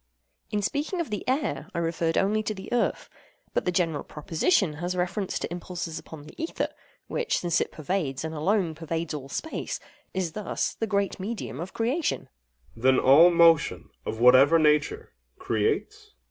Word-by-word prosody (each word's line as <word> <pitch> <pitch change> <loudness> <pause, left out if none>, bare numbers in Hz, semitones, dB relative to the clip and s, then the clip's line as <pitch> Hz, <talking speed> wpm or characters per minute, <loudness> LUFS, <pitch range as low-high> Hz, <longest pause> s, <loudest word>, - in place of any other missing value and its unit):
In 205 -1 -1
speaking 300 - -1
of 330 -10 -3
the 210 - -3
air, 260 - -1
I - - -2
referred 165 0 0
only 210 +3 +2
to 215 0 -3
the 190 +4 -7
earth; 245 - 0 0.5
but - - 0
the 180 - +2
general 165 -5 0
proposition 160 - 0
has 180 +1 -2
reference 180 +2 -1
to - - -4
impulses 175 -2 -5
upon 155 -3 -11
the 150 - -13
ether—which, 460 +7 -3
since 175 -2 +1
it - - -2
pervades, 155 -4 -2
and 160 0 -4
alone 175 +2 +1
pervades 165 0 -4
all 140 -2 -6
space, 320 - -4 0.3
is 185 -3 -2
thus 210 +3 -2
the 225 - -3
great 200 -2 0
medium 185 - -5
of 175 +3 -6
creation. 260 +8 0 0.5
OINOS. 115 - -13
Then 130 0 +5
all 145 +8 +7
motion, 170 -2 +4
of 110 - -4
whatever 130 +6 +7
nature, 150 -1 +2 0.3
creates? - - 0
AGATHOS. - - -29
170 Hz, 170 wpm, -27 LUFS, 155-205 Hz, 0.5 s, all